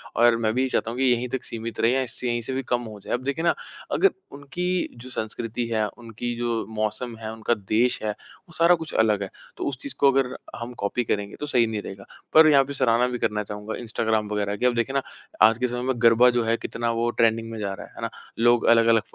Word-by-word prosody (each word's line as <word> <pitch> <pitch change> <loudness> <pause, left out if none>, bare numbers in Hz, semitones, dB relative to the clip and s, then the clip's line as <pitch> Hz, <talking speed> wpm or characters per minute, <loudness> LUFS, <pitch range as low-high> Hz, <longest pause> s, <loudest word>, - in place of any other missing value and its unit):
और 120 0 +5
मैं 110 -1 0
भी 130 +2 +1
चाहता 115 - 0
हूँ 120 - -6
कि 135 - +1
यहीं 125 -1 +2
तक 130 - -3
सीमित 115 -1 -6
रहे 115 +3 +3
और 130 - +1
इससे 125 0 -4
यहीं 120 0 0
से 125 +3 -5
भी 135 - -1
कम 120 0 +1
हो 110 -3 -9
जाए। - - -5
अब 125 +1 -1
देखिए 140 +4 -2
ना 170 - +4 0.4
अगर 395 - +4 0.2
उनकी 145 +5 -5 0.3
जो 125 +2 -10
संस्कृति 115 0 -4
है, 110 -2 0
उनकी 120 +1 -6
जो 120 -2 -1
मौसम 110 +3 -2
है, 110 -1 -6
उनका 110 +1 0 0.2
देश 120 +3 +2
है 105 - 0
वो 170 - -16
सारा 170 +1 +6
कुछ 160 -2 -8
अलग 105 -2 +2
है 95 - -5 0.3
तो - - -4
उस 135 - -5
चीज़ 140 - -4
को 140 -1 +6
अगर 135 -1 0 0.2
हम 120 +1 -6
कॉपी 110 +4 0
करेंगे 100 -2 -2
तो 150 - -3
सही 125 -5 +3
नहीं 110 -2 -3
रहेगा। 100 0 -9 0.3
पर 155 0 +8
यहाँ 140 -2 +6
पर 140 +1 -6
सराहना 120 -2 +3
भी 125 -1 -3
करना 105 -2 0
चाहूँगा 105 +1 -6
इंस्टाग्राम 110 -2 -1
वग़ैरह 100 -1 -1
की। 125 - -1
अब 125 -1 +3
देखिए 120 +3 0
ना 135 - +3 0.5
आज 110 - +1
के 125 +1 0
समय 125 0 -4
में 130 - +2
गरबा 120 +1 +6
जो 120 - +2
है 115 +1 +1
कितना 115 0 -2
वो 115 +1 0
ट्रेंडिंग 115 0 +2
में 110 - -6
जा 100 -2 -2
रहा - - -8
है, - - -22
है - - -9
ना? - - -2 0.3
लोग 120 +1 +4
अलग-अलग 115 -1 +5
115 Hz, 255 wpm, -24 LUFS, 110-125 Hz, 0.5 s, पर